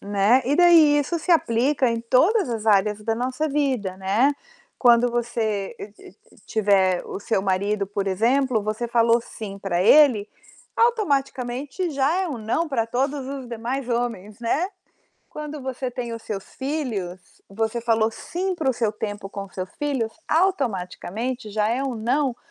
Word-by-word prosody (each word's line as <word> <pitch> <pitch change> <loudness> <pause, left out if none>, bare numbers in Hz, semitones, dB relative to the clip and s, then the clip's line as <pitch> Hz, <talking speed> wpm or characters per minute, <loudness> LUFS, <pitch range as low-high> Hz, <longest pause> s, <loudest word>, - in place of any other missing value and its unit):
Né. 205 +6 +3
E 280 +4 +1
daí, 330 -4 +6
isso 290 +4 -1
se 330 - -4
aplica 260 -3 +3
em 230 0 -2
todas 320 - +3
as 225 -2 -4
áreas 210 0 +3
da 225 +1 0
nossa 255 +6 -2
vida, 265 -10 -1
né. 200 +9 +2 0.5
Quando 240 -1 +5
você 225 -4 -2
e 205 - -9
e 195 - -15 0.2
e - - -20
tiver 195 -4 +2
o - - -6
seu 210 -1 0
marido, 200 +1 0
por 200 0 -3
exemplo, 235 +5 +2
você 215 +3 -3
falou 230 0 +3
"sim" 205 -3 -8
pra 185 -3 -1
ele, 235 -4 +5 0.5
automaticamente 285 - 0
já 290 +6 +1
é 370 - -2
um 290 - -4
"não" 225 +10 -1
pra 235 -6 0
todos 265 +3 -1
os 270 -2 -6
demais 240 +3 -4
homens, 230 -4 -3
né. 285 +10 0 0.6
Quando 300 -1 -7
você 260 0 -4
tem 240 -1 -5
os 230 -1 -7
seus 195 -3 -5
filhos, 245 - -3 0.3
você 220 +3 -2
falou 225 -1 +2
"sim" 365 +10 -3
para 315 -6 0
o - - +1
seu 225 -3 0
tempo 205 -2 -5
com 200 0 -6
seus 185 0 -6
filhos, 270 -7 -1 0.2
automaticamente 245 - -1
já 210 +1 0
é 245 +4 0
um 265 -3 -2
não 250 +3 0
235 Hz, 165 wpm, -23 LUFS, 210-275 Hz, 0.6 s, daí